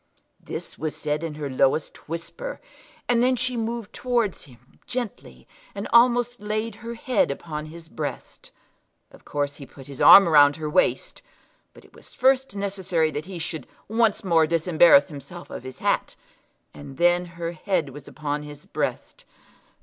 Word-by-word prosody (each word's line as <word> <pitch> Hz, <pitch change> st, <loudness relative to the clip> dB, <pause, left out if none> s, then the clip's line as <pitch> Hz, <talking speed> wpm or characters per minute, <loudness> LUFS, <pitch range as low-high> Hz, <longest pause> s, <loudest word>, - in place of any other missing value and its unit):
This -, -, -7 dB
was 155 Hz, +1 st, -3 dB
said 150 Hz, +1 st, -2 dB
in 160 Hz, -2 st, -4 dB
her 150 Hz, -1 st, -4 dB
lowest 135 Hz, +3 st, 0 dB
whisper, 480 Hz, -, -6 dB, 0.5 s
and 240 Hz, -1 st, +3 dB
then 255 Hz, +1 st, +3 dB
she 250 Hz, +1 st, 0 dB
moved 230 Hz, -1 st, -4 dB
towards 240 Hz, -6 st, -1 dB
him 125 Hz, -2 st, -21 dB
gently, 215 Hz, -, -6 dB, 0.3 s
and 200 Hz, +1 st, -4 dB
almost 245 Hz, 0 st, +4 dB
laid 215 Hz, +1 st, -3 dB
her 235 Hz, +1 st, -6 dB
head 245 Hz, 0 st, +1 dB
upon 150 Hz, +2 st, -5 dB
his 165 Hz, +1 st, -11 dB
breast. 155 Hz, -2 st, -7 dB, 0.6 s
Of -, -, -18 dB
course 145 Hz, -1 st, -3 dB
he 140 Hz, -, -10 dB
put 135 Hz, -, -14 dB
his 140 Hz, -1 st, -8 dB
arm 195 Hz, -2 st, +10 dB
round 145 Hz, -3 st, +6 dB
her 155 Hz, -1 st, -5 dB
waist, 215 Hz, -, 0 dB, 0.5 s
but -, -, -18 dB
it -, -, -22 dB
was -, -, -15 dB
first 265 Hz, -3 st, +2 dB
necessary 190 Hz, -5 st, -1 dB
that 150 Hz, +1 st, -5 dB
he 185 Hz, -1 st, -8 dB
should 165 Hz, -1 st, -5 dB, 0.2 s
once 225 Hz, -1 st, +1 dB
more 165 Hz, -4 st, +3 dB
disembarrass 165 Hz, -2 st, +5 dB
himself 150 Hz, +4 st, -10 dB
of -, -, -6 dB
his 130 Hz, 0 st, -9 dB
hat, -, -, -1 dB, 0.6 s
and 140 Hz, -2 st, -11 dB
then 175 Hz, +1 st, +3 dB
her 170 Hz, 0 st, -3 dB
head 170 Hz, -2 st, -1 dB
was 140 Hz, +1 st, -11 dB
upon 150 Hz, -1 st, -4 dB
his 150 Hz, 0 st, -11 dB
breast. -, -, -4 dB
170 Hz, 165 wpm, -24 LUFS, 150-225 Hz, 0.6 s, arm